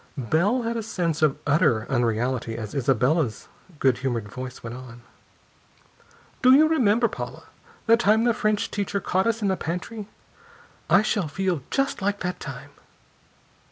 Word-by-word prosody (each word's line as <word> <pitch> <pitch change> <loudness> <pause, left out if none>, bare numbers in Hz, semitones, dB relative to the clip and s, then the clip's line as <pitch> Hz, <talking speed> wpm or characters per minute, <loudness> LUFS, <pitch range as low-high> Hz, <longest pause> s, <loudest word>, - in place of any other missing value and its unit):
Bell 175 - +1
had 230 +1 -2
a - - -1
sense 175 -7 -2
of 150 -3 +3
utter 145 -7 +2
unreality 120 -1 0
as 110 -2 -6
Isabella's 135 0 +1 0.3
good 130 -4 +2
humored 120 -5 -2
voice 125 +1 -8
went 115 +1 -6
on: 125 -2 -11 1.4
"Do 255 0 +7
you 310 +3 +6
remember, 240 -7 +3
Paula, - - -7 0.4
the 230 0 +5
time 220 -1 +3
the 240 -1 +3
French 215 -1 0
teacher 200 -1 -2
caught 190 +2 0
us 225 -1 0
in - - +2
the 190 - +2
pantry? 185 +6 -5 0.8
I 195 - +5
shall 205 -5 0
feel 180 0 -1
just 275 -4 -1
like 205 +1 -1
that 180 0 -3
time." - - -8
175 Hz, 155 wpm, -24 LUFS, 130-215 Hz, 1.4 s, Do